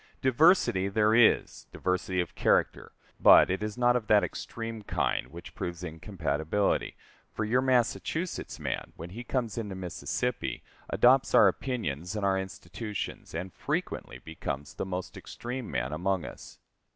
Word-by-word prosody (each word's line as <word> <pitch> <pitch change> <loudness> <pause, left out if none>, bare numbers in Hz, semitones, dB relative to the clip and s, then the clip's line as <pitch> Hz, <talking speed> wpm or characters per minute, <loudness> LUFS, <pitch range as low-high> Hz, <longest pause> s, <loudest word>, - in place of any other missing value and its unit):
Diversity 130 - +4
there 105 +2 +3
is 115 -1 +3
diversity 90 0 -1
of 90 - -6
character - - +1 0.3
but - - +7
it 95 - -1
is 105 +1 -4
not 120 0 +4
of 115 -4 -1
that 105 -1 +5
extreme 115 -1 -5
kind 100 - -1
which 85 +6 -11
proves 85 0 -5
incompatibility; 80 +2 -1 0.4
for 110 - -1
your 125 +4 +2
Massachusetts 130 +7 0
man, - - -4
when 85 +2 -8
he 115 +5 -7
comes 120 -3 -2
into 105 -4 -5
Mississippi, 95 +7 -3 0.3
adopts 130 +2 +4
our 105 - +8
opinions 90 - -2
and 105 -2 -1
our 95 -1 +2
institutions, 95 +2 -6
and 90 +2 -4
frequently - - -3
becomes 70 0 -6
the - - -4
most 90 +1 -5
extreme 120 +5 -6
man - - -2
among 90 +1 -1
us. - - -10
100 Hz, 145 wpm, -29 LUFS, 90-120 Hz, 0.4 s, our